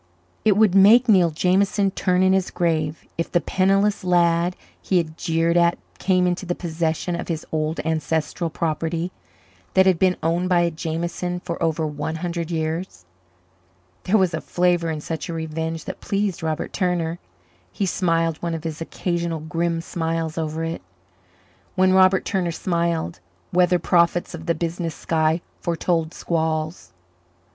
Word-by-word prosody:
It 210 -2 +4
would 215 -4 +5
make 215 +6 +7
Neil 185 -6 +5
Jameson 190 +4 +2
turn 185 -1 +1
in 190 0 +4
his 190 -1 +1
grave 160 -3 -1
if 165 - -2
the 175 - +3
penniless 195 +5 +1
lad 175 0 +2 0.3
he 185 - +1
had 160 -2 -1
jeered 165 0 0
at 170 0 +3 0.2
came 185 -1 +2
into 180 +1 0
the 175 -1 -2
possession 165 0 -2
of 170 - -5
his 165 -3 -3
old 155 +1 -1
ancestral 160 +1 -1
property 165 +2 -2 0.6
that 190 0 +6
had 185 -3 +3
been 185 -1 +3
owned 170 +3 +1
by 175 -1 +4
a 170 0 +1
Jameson 170 +2 -3
for 170 -2 -5
over 160 -1 +1
one 150 +1 -3
hundred 170 0 -3
years. 160 - -3 1.0
There 210 +4 +4
was 185 -4 +2
a 160 - -2
flavour 175 -1 +1
in 155 -2 -3
such 160 +1 -5
a - - -3
revenge 160 0 -4
that - - -7
pleased 200 -2 -1
Robert 160 -1 -3
Turner. 175 -3 -1 0.5
He 200 - -1
smiled 165 -3 +1
one 170 -1 -2
of 160 - -6
his 160 -1 -5
occasional 170 -1 -2
grim 165 +1 -1
smiles 165 -1 -2
over 160 0 -3
it. 165 0 -3 0.9
When 185 0 +4
Robert 190 0 +5
Turner 185 -4 0
smiled, 170 -1 -1 0.3
weather 180 0 +4
prophets 170 +1 +2
of 165 0 -8
the 170 - +2
business 165 0 -3
sky 160 0 +1 0.2
foretold 165 -1 -1
squalls. 160 0 -2
170 Hz, 155 wpm, -23 LUFS, 160-180 Hz, 1.0 s, make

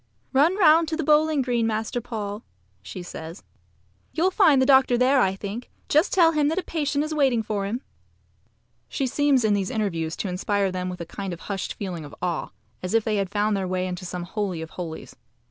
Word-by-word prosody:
"Run 310 +8 +4
round 330 -3 +5
to 315 0 -2
the 325 - -1
bowling 300 -1 +3
green, 240 -2 +1
Master 220 +3 -2
Paul," 215 -3 -5 0.4
says 170 - -8
she. - - -33
"You'll 365 +4 +3
find 345 -9 +5
the 260 - +4
doctor 265 -2 +5
there, 255 +2 +4
I 190 -2 +2
think. 205 +5 -6 0.2
Just 305 +6 +3
tell 335 -3 +5
him 300 -2 +2
that 320 +4 0
a 380 - 0
patient 295 -2 -1
is 310 +1 -3
waiting 265 -6 +2
for 205 -2 -2
him." 235 +5 -3 1.1
She 275 - -1
seems 270 -2 +2
in 210 - +3
these 195 -2 0
interviews 170 -7 -2
to - - -3
inspire 195 +1 0
them 185 0 -3
with 180 -1 -6
a - - -4
kind 190 +2 -5
of 170 - -9
hushed 195 -2 -4
feeling 180 -5 -5
of 145 - -10
awe, 175 -3 -2 0.3
as 185 +4 -2
if 225 - +3
they 215 -1 0
had 195 -2 -1
found 210 +1 +1
their 190 -1 -2
way 185 0 -1
into 180 0 -5
some 180 0 -5
holy 190 -1 -3
of 160 - -10
holies. 165 -3 -7
215 Hz, 215 wpm, -24 LUFS, 185-280 Hz, 1.1 s, round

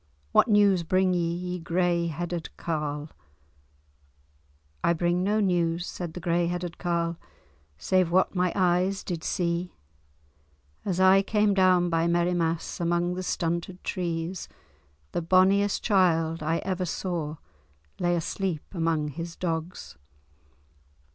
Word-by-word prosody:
"What - - +5
news 205 -4 +4
bring 185 +2 +2
ye, 170 -1 0
ye 180 +1 -4
grey 170 0 0
headed 170 +1 -4
carle?" 150 -2 -3 1.7
"I 170 - +4
bring 175 +1 0
no 210 +3 +1
news," 175 -3 +1
said 175 -4 -6
the - - -4
grey 170 0 +1
headed 175 -1 -4
carle, 170 -2 -1 0.6
"save 185 - +2
what 185 +2 +2
my 180 -1 +1
eyes 185 +1 +1
did 170 -3 -4
see. 175 0 -2 1.1
As 185 -3 -2
I 190 +1 +6
came 210 0 +2
down 185 -2 +3
by 165 0 +2
Merrimass 170 -1 0
among 175 +1 0
the 185 - -4
stunted 170 0 -3
trees, 175 -1 -3 0.6
the - - -1
bonniest 190 +4 +3
child 165 -6 +2
I 160 +2 0
ever 185 -1 -1
saw 170 -3 -3 0.6
lay 175 0 +2
asleep 170 -1 -2
among 165 -3 0
his 165 +3 -6
dogs. 160 - -4
175 Hz, 125 wpm, -27 LUFS, 165-185 Hz, 1.7 s, I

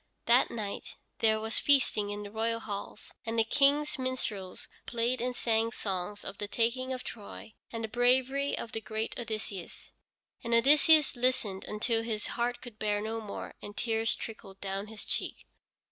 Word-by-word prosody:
That 240 +2 +5
night 210 -3 -5 0.2
there 220 -1 +4
was 220 +1 +1
feasting 255 -7 +3
in 205 0 -4
the 205 - -8
royal 225 +1 0
halls, 205 -1 -6
and 225 0 -3
the 225 - +6
King's 285 +5 +3
minstrels 220 -8 -3 0.2
played 240 +1 0
and 250 0 -1
sang 225 -1 +1
songs 200 -1 -3
of 195 - -6
the 205 - -2
taking 240 +4 0
of 255 -1 -3
Troy, 215 0 -8 0.2
and 230 -1 -3
of 220 - -9
the - - -10
bravery 260 +3 +3
of 230 - -5
the 225 - -3
great 220 +1 -3
Odysseus. 215 -5 -5 0.5
And 235 -1 +2
Odysseus 295 +4 +6
listened 240 -6 0
until 225 +2 0
his 220 -2 -2
heart 240 +1 -1
could 230 -3 -10
bear 210 -1 +1
no 220 +2 -3
more, 210 -2 -6
and 205 0 -9
tears 225 -1 +1
trickled 200 -3 -8
down 195 +1 -3
his 220 -1 -7
cheeks. - - -2
225 Hz, 175 wpm, -31 LUFS, 210-245 Hz, 0.5 s, the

